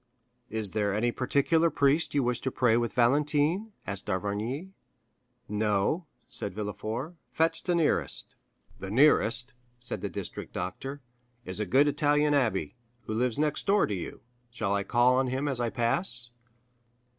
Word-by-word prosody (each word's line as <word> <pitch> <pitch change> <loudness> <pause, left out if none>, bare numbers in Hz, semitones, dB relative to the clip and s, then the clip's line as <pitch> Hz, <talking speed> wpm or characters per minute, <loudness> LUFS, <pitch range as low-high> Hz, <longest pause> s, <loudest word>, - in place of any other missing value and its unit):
"Is 110 -3 -3
there 100 -2 0
any 120 +3 +1
particular 145 +7 +2
priest 145 +1 +2
you 140 - +3
wish 125 0 -1
to 130 - -1
pray 120 -3 +3
with 120 0 0
Valentine?" 150 - +2
asked 100 0 -4
d'Avrigny. 105 - -3 0.8
"No." 105 - 0 0.2
said 100 -3 -5
Villefort; 110 - -4 0.2
"fetch 165 +1 0
the 180 - 0
nearest." 165 -3 0 0.5
"The 95 - -6
nearest," 125 0 +4 0.2
said 120 -1 -1
the - - -3
district - - -7
doctor, 135 +10 -5 0.4
"is 95 +2 -5
a 105 - -2
good 140 +10 +4
Italian 145 0 +2
abbé, 130 -6 +1 0.3
who 110 - -5
lives 120 +1 0
next 150 +4 -1
door 200 +1 +4
to 105 - -3
you. 90 -4 -6 0.3
Shall 110 -4 -2
I 100 - +1
call 120 +4 +3
on 130 0 +2
him 130 +3 -2
as 135 -4 -1
I 120 -1 0
pass?" 120 +1 +2
125 Hz, 155 wpm, -28 LUFS, 110-145 Hz, 0.8 s, nearest